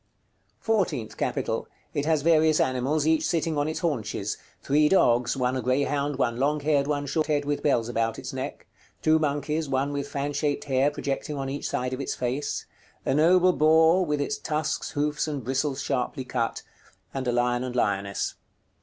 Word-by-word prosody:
FOURTEENTH 195 - 0
CAPITAL. - - -2 0.3
It 145 +1 -1
has 155 -3 +2
various 160 -1 +4
animals, 135 +4 +1
each 160 0 +3
sitting 165 -2 0
on 145 0 0
its 155 - -3
haunches. 110 - -2 0.3
Three 150 +2 +3
dogs, 125 -8 +3
one 125 0 0
a 130 - -1
greyhound, 140 +2 0
one 120 -3 0
long 145 +4 +1
haired, 145 -1 +2
one 145 -1 -1
short 155 +2 0
haired 145 -2 +1
with 145 0 -1
bells 120 -6 +2
about 115 -1 -1
its - - -6
neck; - - -5 0.4
two 155 0 +4
monkeys, 150 +1 -1
one 135 +2 0
with 140 0 -3
fan 140 0 -3
shaped 145 0 -1
hair 135 0 +2
projecting 145 0 -3
on 135 -1 -3
each 140 - -3
side 125 +1 -2
of 130 - -3
its 140 - -3
face; 130 +4 -2 0.4
a - - +1
noble 180 +5 +5
boar, 160 +4 +5
with 150 -4 -1
its 145 - -2
tusks, 155 0 -2
hoofs, 150 +1 -1
and 145 -4 -3
bristles 135 +3 -1
sharply 130 0 -2
cut; 120 -2 -2 0.5
and 130 -1 -3
a - - +2
lion 120 0 +1
and 125 -1 -5
lioness. 100 -4 0
145 Hz, 180 wpm, -26 LUFS, 130-155 Hz, 0.5 s, noble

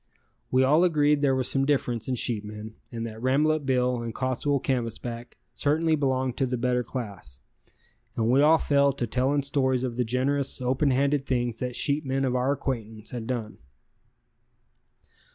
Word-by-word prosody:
We 130 +1 +3
all 150 +6 +4
agreed 150 -4 +3
there 135 -2 +3
was 130 -1 0
some 135 - +1
difference 130 -5 0
in 130 - 0
sheepmen, 105 -2 -3 0.2
and 115 -1 -4
that 110 -1 -8
Rambolet 145 +3 +1
Bill 125 -2 +1
and 115 -1 -5
Cottswool 135 +2 0
Canvasback 120 -1 -3 0.2
certainly 160 +2 +1
belonged 130 -3 -1
to 135 - +1
the 125 0 -2
better 125 +1 +1
class, 100 - -7 0.8
and 110 - 0
we 135 +2 +5
all 155 +2 +6
fell 140 -2 +2
to 125 - -2
telling 130 +5 0
stories 130 -2 +1
of 120 -2 -3
the 125 - +2
generous, 135 +4 -1
open 130 +3 +1
handed 140 +1 +1
things 120 -3 -1
that 125 -1 -3
sheepmen 135 -2 0
of 125 -1 0
our 125 +2 +1
acquaintance 115 -6 -4
had 115 -3 -5
done. 115 -4 -4
130 Hz, 165 wpm, -26 LUFS, 120-140 Hz, 0.8 s, all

